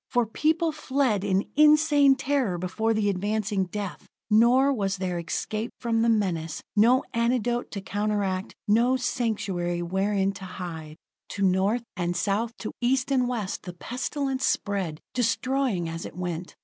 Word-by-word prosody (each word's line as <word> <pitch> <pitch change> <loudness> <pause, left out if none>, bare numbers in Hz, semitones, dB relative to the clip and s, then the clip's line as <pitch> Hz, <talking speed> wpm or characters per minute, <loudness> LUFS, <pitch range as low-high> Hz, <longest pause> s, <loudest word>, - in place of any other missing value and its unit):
For 245 -2 +2
people 315 +8 +1
fled 265 -8 0
in 195 -1 +1
insane 300 -2 +6
terror 265 -9 0
before 185 +6 -1
the 215 -1 +1
advancing 205 0 0
death. 200 +1 -6 0.2
Nor 250 +6 +5
was 200 -5 -1
there 180 -2 -2
escape 215 +7 -3
from 230 -1 0
the 230 - +3
menace 175 -8 0 0.2
no 235 +5 +5
antidote 240 0 0
to 200 - -5
counteract, 205 -1 -2
no 235 +5 +4
sanctuary 210 -8 -1
wherein 195 +2 0
to 195 -1 -9
hide. 165 -4 -7 0.4
To 200 - -2
North 195 +5 +2
and 175 -1 -1
South, 215 +5 -1
to 215 - -5
East 255 +2 +1
and 255 -2 +2
West, 225 -6 -3
the 180 - -8
pestilence 265 - -3
spread, 190 -6 -1
destroying 250 -5 0
as 165 +1 -5
it - - -13
went. 175 -1 -5
210 Hz, 150 wpm, -26 LUFS, 185-245 Hz, 0.4 s, insane